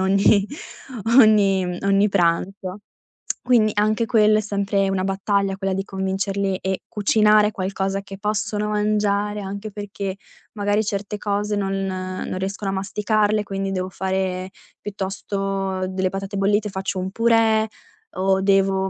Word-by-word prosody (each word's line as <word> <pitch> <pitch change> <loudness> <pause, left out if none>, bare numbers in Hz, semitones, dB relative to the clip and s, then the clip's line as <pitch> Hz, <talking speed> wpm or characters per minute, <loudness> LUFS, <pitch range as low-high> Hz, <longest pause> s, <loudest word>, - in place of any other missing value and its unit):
ogni 195 +1 +4 0.7
ogni 200 -4 +5 0.2
ogni 200 +1 +3
pranzo. 185 +1 0 0.6
Quindi, 230 -4 +4
anche 215 +2 +2
quello 215 -2 +4
è - - +1
sempre 200 -1 0
una 190 -1 0
battaglia, 195 0 0
quella 195 -1 -1
di 195 - -1
convincerli 195 0 -2
e 190 0 -3
cucinare 210 0 +3
qualcosa 195 0 -2
che 195 -1 -10
possono 210 0 -1
mangiare, 210 0 0
anche 200 +2 -6
perché 200 -1 -5 0.4
magari 205 0 +1
certe 205 +1 -3
cose 205 0 -1
non 195 -1 -1
non 185 0 -4
riescono 195 +1 -3
a - - -3
masticarle, 210 +2 +1
quindi 195 -1 -3
devo 185 -1 -2
fare 190 0 -2 0.3
piuttosto 195 -1 -3
delle 185 0 -1
patate 195 +1 -5
bollite, 205 +2 +1
faccio 190 0 -3
un 185 +1 -3
purè, 225 -1 +3 0.5
o 190 0 +2
devo 195 -1 +2
195 Hz, 135 wpm, -22 LUFS, 190-210 Hz, 0.7 s, ogni